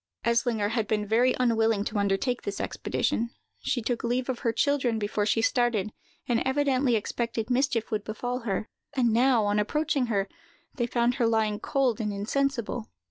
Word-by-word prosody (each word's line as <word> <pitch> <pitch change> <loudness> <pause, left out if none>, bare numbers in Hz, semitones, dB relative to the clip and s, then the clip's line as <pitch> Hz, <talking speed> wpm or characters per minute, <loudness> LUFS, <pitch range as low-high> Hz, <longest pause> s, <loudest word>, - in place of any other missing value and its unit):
Eslinger 235 -3 +1
had 225 -3 0
been 210 -1 0
very 235 +5 +3
unwilling 225 -4 +2
to 210 0 -2
undertake 200 +6 0
this 200 - -4
expedition: 235 +1 -1 0.3
she 245 -3 -1
took 235 0 -2
leave 245 +2 -1
of 255 - -2
her 230 - +1
children 255 -1 +1
before 205 0 -1
she 225 +1 +2
started, 225 -4 +1 0.4
and 240 -2 +2
evidently 265 -2 +2
expected 230 +2 -2
mischief 245 -3 +1
would 215 -1 -1
befall 245 +4 -3
her; 215 -2 -2 0.3
and 240 -4 +2
now, 240 -2 +4
on 205 +1 +2
approaching 285 +4 0
her, 200 -3 0 0.5
they 240 -3 -1
found 240 0 +2
her 230 - +4
lying 220 -2 +1
cold 255 -2 0
and 210 -1 -1
insensible. 235 +2 -1
235 Hz, 170 wpm, -27 LUFS, 215-250 Hz, 0.5 s, now